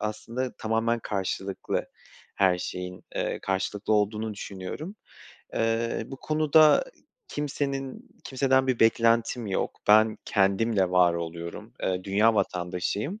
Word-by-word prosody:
aslında 115 +4 -4
tamamen 115 +1 0
karşılıklı. 95 -1 -3 0.5
Her 95 -2 +3
şeyin, 90 0 -6
eee, - - -2
karşılıklı 100 +2 -1
olduğunu 105 +1 0
düşünüyorum. 100 - -7 0.6
Eee, 115 +1 0
bu 135 - -8
konuda 155 - +4 0.4
kimsenin 140 -2 -4 0.2
kimseden 130 0 +2
bir 130 -3 0
beklentim 115 +1 +3
yok. 95 - -2
Ben 110 +1 +5
kendimle 100 0 +2
var 90 -1 +4
oluyorum. 85 0 -6
Eee, 90 -1 -1
dünya 105 +3 +3
vatandaşıyım. 95 - -2
110 Hz, 110 wpm, -27 LUFS, 95-125 Hz, 0.6 s, Ben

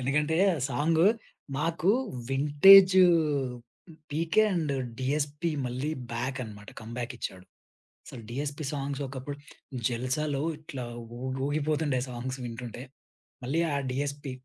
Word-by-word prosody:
ఎందుకంటే 150 +5 +1 0.3
సాంగు 160 +5 +2 0.5
మాకు 165 +3 +1 0.4
vintage 185 +8 +8 1.1
PK 165 +7 +2
and 160 -5 0 0.3
DSP 145 +4 -1 0.2
మళ్ళీ 130 +5 -3 0.2
బ్యాకనమాట. 115 -4 -5
కమ్‌బ్యా‌కిచ్చాడు. 115 -4 -6 0.6
అసలు 115 - -10
డీఎస్‌పీ 145 +4 -4
సాంగ్స్ 140 0 -3
ఒకప్పుడు 140 +2 -6 0.5
జల్సాలో 130 +4 -1 0.2
ఇట్లా 140 -5 -7 0.4
ఊగ్ 130 0 -3
ఊగిపోతుండే 150 -2 0
సాంగ్స్ 125 +2 -5
వింటుంటే. 120 0 -7 0.6
మళ్ళీ 145 +7 0
ఆ - - 0 0.2
డీఎస్‌పీ 140 +1 -3
140 Hz, 95 wpm, -28 LUFS, 125-150 Hz, 1.1 s, vintage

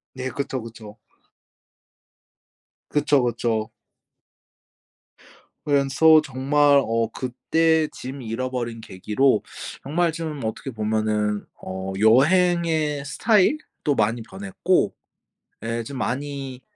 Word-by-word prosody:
네 130 0 -4
그쵸, 135 -1 -4
그쵸. 110 -1 -11 1.9
그쵸, 145 -2 +2
그쵸. 115 -2 -1 1.9
그래서 145 +2 +5
정말 140 +1 +3
어 115 0 0
그때 160 +6 +1
짐 130 +2 -8
잃어버린 120 0 -4
계기로 105 +4 +1 0.4
정말 165 +5 +1
좀 160 -3 -5
어떻게 110 +4 -4
보면은 105 -1 -1 0.2
어 95 +1 -5
여행의 155 - +3
스타일도 200 - +1
많이 110 +2 +1
변했고 190 - -1 0.7
예 115 +1 -2
좀 135 +4 -7
많이 135 0 -4
130 Hz, 185 characters per minute, -23 LUFS, 115-150 Hz, 1.9 s, 그래서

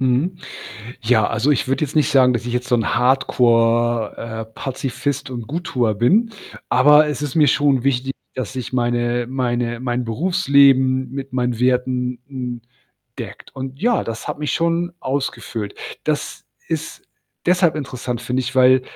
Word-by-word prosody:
Mhm. 135 +8 +1 0.7
Ja, 110 -2 +3
also, 115 +6 +1
ich 135 - 0
würde 135 +2 0
jetzt 150 +1 -5
nicht 150 - +3
sagen, 130 -2 +5
dass 120 0 -2
ich 120 - -3
jetzt 125 0 -2
so 125 - +4
'n 115 0 0
Hardcore, 120 -2 +2
äh, 110 -1 -5
Pazifist 135 +1 -3
und 120 -4 -6
„Gut-Tuer“ 130 -8 -1
bin, 210 - +3 0.4
aber 150 +4 +6
es 150 -1 -3
ist 145 -3 -4
mir 155 -2 +5
schon 140 -2 +2
wichtig, 135 0 0 0.2
dass 130 -1 -5
ich 130 -2 -5
meine 120 -1 0
meine 120 -2 -2
mein 125 -1 -2
Berufsleben 135 - +3
mit 135 -1 -6
meinen 125 -2 -1
Werten 125 0 0
n 125 -3 -5 0.6
deckt. - - -9
Und, 135 0 -6
ja, 240 0 +2
das 115 0 -6
hat - - -4
mich 150 -1 -2
schon 170 +1 0
ausgefüllt. 130 -6 -3 0.3
Das - - -3 0.2
ist - - -4 0.4
deshalb 180 -2 +3
interessant, 125 -4 -4
finde 125 +1 -1
ich, 130 +1 -5
weil 130 0 +6
130 Hz, 160 wpm, -20 LUFS, 120-140 Hz, 0.7 s, aber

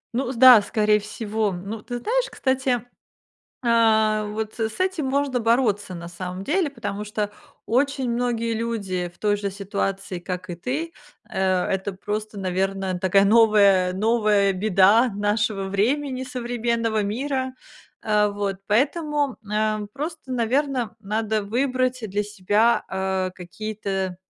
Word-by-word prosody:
Ну, 255 0 -1
с - - -6
да, 250 -2 +9
скорее 210 +1 +2
всего. 215 0 -2
Ну, 195 +4 -6
ты 245 +2 -5
знаешь, - - 0
кстати, 260 -3 0 0.8
а, 220 -2 +3
вот 215 +2 -5
с 225 +9 -3
этим 370 -5 0
можно 270 -2 0
бороться 225 -5 +1
на 170 0 -7
самом 180 +1 -6
деле, 315 - 0
потому 210 -5 -5
что 210 0 -3 0.4
очень 265 +1 +1
многие 235 -1 -1
люди 200 -6 -2
в - - -27
той 205 -1 +1
же 200 -1 -3
ситуации, 195 -2 -3
как 180 +1 -5
и 175 - -4
ты, 290 - -3 0.4
э, 190 - -4 0.2
это 195 +1 -2
просто, 210 +2 -5
наверно, 190 0 -1
такая 195 +2 +3
новая 200 -4 +5
новая 210 -1 +2
беда 205 +5 +4
нашего 205 0 0
времени, 255 +7 0
современного 235 -3 -1
мира. 260 +5 -2 0.5
Э, 210 -1 +2
вот 200 -1 -2
поэтому, 290 +3 +1 0.2
э, 215 0 0
просто, 300 -1 -6
наверно, 250 -1 0
надо 215 +1 -1
выбрать 255 +3 0
для 205 +2 -1
себя, 210 +3 +1
а, 190 -1 -1
какие-то 195 0 -4
215 Hz, 135 wpm, -23 LUFS, 200-245 Hz, 0.8 s, да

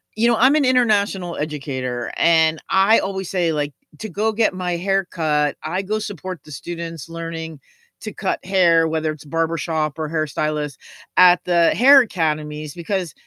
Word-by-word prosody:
you 230 +2 +2
know, 235 - +3
I'm 260 +5 +5
an 290 -3 +3
international 205 -8 +1
educator, 130 -5 -4
and 160 -1 +3
I 195 +4 +4
always 190 -2 -4
say, 175 -4 0
like, 145 -1 -2 0.3
to 220 - -6
go 215 +5 0
get 220 -2 +1
my 180 -1 -2
hair 195 +1 0
cut, 150 -4 0
I 185 +5 -2
go 215 +3 -2
support 185 -3 -6
the 150 - -14
students 165 0 -7
learning 165 -2 -6 0.4
to - - -6
cut - - -3
hair, 170 -4 +3
whether 160 -1 -1
it's 155 -1 -10
barbershop 160 -1 -2
or 155 -1 -3
hairstylist 150 -2 -2 0.4
at 180 -1 +6
the 170 -2 +3
hair 270 +3 +7
academies, 155 -7 -3
because 175 0 -3
165 Hz, 165 wpm, -20 LUFS, 155-195 Hz, 0.4 s, hair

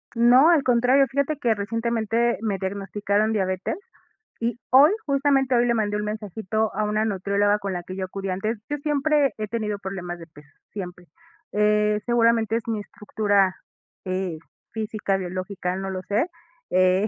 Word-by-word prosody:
No, 245 +6 +6
al 325 -5 +4
contrario, 250 +2 +4
fíjate 280 +3 0
que 240 -5 +2
recientemente 230 +2 0
me 210 -3 -1
diagnosticaron 200 +2 -1
diabetes, 185 -2 -1 0.6
y 235 0 -2
hoy 275 +6 +7
justamente, 275 -2 +2
hoy 240 0 +4
le 240 - +2
mandé 210 -2 0
un 210 - -2
mensajito 215 0 -2
a 215 - 0
una 215 +1 0
nutrióloga, 205 0 +1
con 200 -2 -3
la 175 -1 -4
que 185 - -8
yo 190 0 -3
acudí 195 +1 -5
antes. 215 +5 -2
Yo 295 - -1
siempre 295 -1 +2
he 215 -1 -3
tenido 210 -2 -3
problemas 180 -3 -5
de 165 - -11
peso, 150 -2 -17 0.2
siempre. 180 -3 -7 0.5
Eh, 210 0 +2
seguramente 230 -2 +3
es 230 - -7
mi 225 -2 -1
estructura, 205 -3 0 0.5
eh, 185 -3 -3 0.3
física, 215 -2 -2
biológica, 185 0 -3
no 195 0 -4
lo 185 -1 -4
sé, 215 - 0 0.4
eh, 185 +2 +3
210 Hz, 160 wpm, -24 LUFS, 195-235 Hz, 0.6 s, hoy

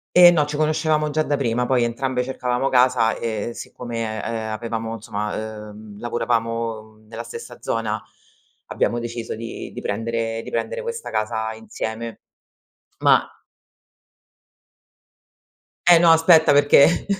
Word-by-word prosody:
Ehm, 175 -1 +9
no, 150 -2 +3
ci 150 0 -4
conoscevamo 155 0 +1
già 155 +1 +1
da 145 -1 0
prima, 125 -2 0
poi 125 -2 +2
entrambe 125 +2 -1
cercavamo 125 0 -1
casa 125 -3 +3
e 110 0 -3
siccome, 115 -3 -5
ehm, 110 -1 -3
avevamo 115 0 -4
insomma, 105 0 -5
uhm, 105 -1 -12
lavoravamo, 115 -1 -1
mhmm, 110 0 -21
nella 115 +1 -6
stessa 120 +1 -9
zona 110 -1 -2 0.7
abbiamo 120 - 0
deciso 120 -1 -5
di 115 +1 -7
di - - -7
prendere 115 +1 -2
di - - -9
prendere - - -3
questa 470 -1 -5
casa 110 0 -2
insieme. 110 +1 -6 0.8
Ma - - +4 2.6
Eh 175 -1 +8
no, 170 -1 +5
aspetta 165 -1 +6
perché, 145 +3 +5
115 Hz, 130 wpm, -22 LUFS, 110-135 Hz, 2.6 s, Ehm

